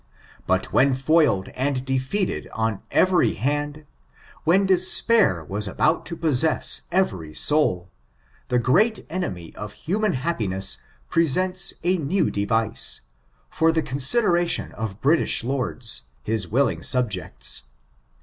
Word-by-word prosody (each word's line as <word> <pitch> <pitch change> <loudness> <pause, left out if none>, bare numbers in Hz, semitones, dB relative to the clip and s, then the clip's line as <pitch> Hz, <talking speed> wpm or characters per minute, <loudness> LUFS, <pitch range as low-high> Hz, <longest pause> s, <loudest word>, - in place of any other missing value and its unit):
But 95 0 -1
when 135 0 +3
foiled 135 - +1
and 130 0 -3
defeated 135 +9 -2
on 110 -3 -2
every 185 -1 +2
hand, 145 +5 -3 0.6
when 190 +5 +3
despair 185 - +3
was 100 +6 -1
about 155 - 0
to 170 - -6
possess 155 -1 +3
every 95 - -1
soul, 95 - +1 0.6
the 125 - 0
great 195 - +1
enemy 90 - -5
of 105 -1 -8
human 205 +4 -2
happiness 105 - -1 0.3
presents 180 +3 +2
a 180 +1 +1
new 170 +6 0
device, 110 +2 +2 0.5
for 160 - +1
the 160 -1 -1
consideration 175 - +2
of 110 -3 -7
British 155 -3 +2
lords, 125 -2 -2 0.2
his 110 -4 -2
willing 135 +9 0
subjects. 105 - -1
140 Hz, 115 wpm, -22 LUFS, 110-170 Hz, 0.6 s, when